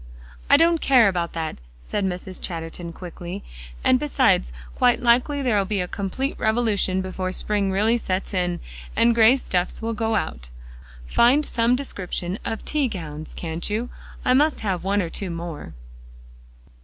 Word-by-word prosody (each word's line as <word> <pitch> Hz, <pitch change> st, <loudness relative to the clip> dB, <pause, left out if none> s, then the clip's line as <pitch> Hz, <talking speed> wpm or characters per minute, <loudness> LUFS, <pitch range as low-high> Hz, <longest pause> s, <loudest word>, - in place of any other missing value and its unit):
"I -, -, +8 dB
don't 330 Hz, +1 st, +3 dB
care 250 Hz, -5 st, +6 dB
about 175 Hz, -3 st, -1 dB
that," 160 Hz, -1 st, -3 dB, 0.3 s
said 205 Hz, -, -2 dB
Mrs. 185 Hz, 0 st, -4 dB
Chatterton 170 Hz, 0 st, -5 dB
quickly, 175 Hz, +2 st, -8 dB, 0.4 s
"and 255 Hz, -, +4 dB
besides, 155 Hz, -, +2 dB, 0.2 s
quite 245 Hz, -1 st, +3 dB
likely 250 Hz, +4 st, +2 dB
there'll 215 Hz, -6 st, +2 dB
be 200 Hz, +1 st, -2 dB
a 180 Hz, -, -1 dB
complete 200 Hz, +9 st, -3 dB
revolution 215 Hz, -4 st, +1 dB
before 185 Hz, 0 st, -3 dB
spring 200 Hz, 0 st, +1 dB
really 220 Hz, +5 st, +2 dB
sets 190 Hz, -1 st, -3 dB
in, 180 Hz, -2 st, -1 dB, 0.3 s
and 235 Hz, 0 st, +4 dB
gray 230 Hz, +2 st, +6 dB
stuffs 180 Hz, -9 st, -1 dB
will 230 Hz, 0 st, -2 dB
go 225 Hz, 0 st, 0 dB
out. -, -, -3 dB, 0.6 s
Find 250 Hz, -, +4 dB
some 235 Hz, +1 st, +2 dB
description 195 Hz, -7 st, -3 dB
of 225 Hz, -1 st, -4 dB
tea 295 Hz, -3 st, +1 dB
gowns, 160 Hz, -8 st, -7 dB
can't 165 Hz, +2 st, -3 dB
you? 225 Hz, +4 st, -2 dB, 0.3 s
I 250 Hz, -, +4 dB
must 295 Hz, +4 st, +3 dB
have 190 Hz, -5 st, -1 dB
one 200 Hz, +1 st, +1 dB
or 165 Hz, -, -5 dB
two 195 Hz, -, -4 dB
more." 170 Hz, -2 st, -6 dB
200 Hz, 155 wpm, -23 LUFS, 180-235 Hz, 0.6 s, I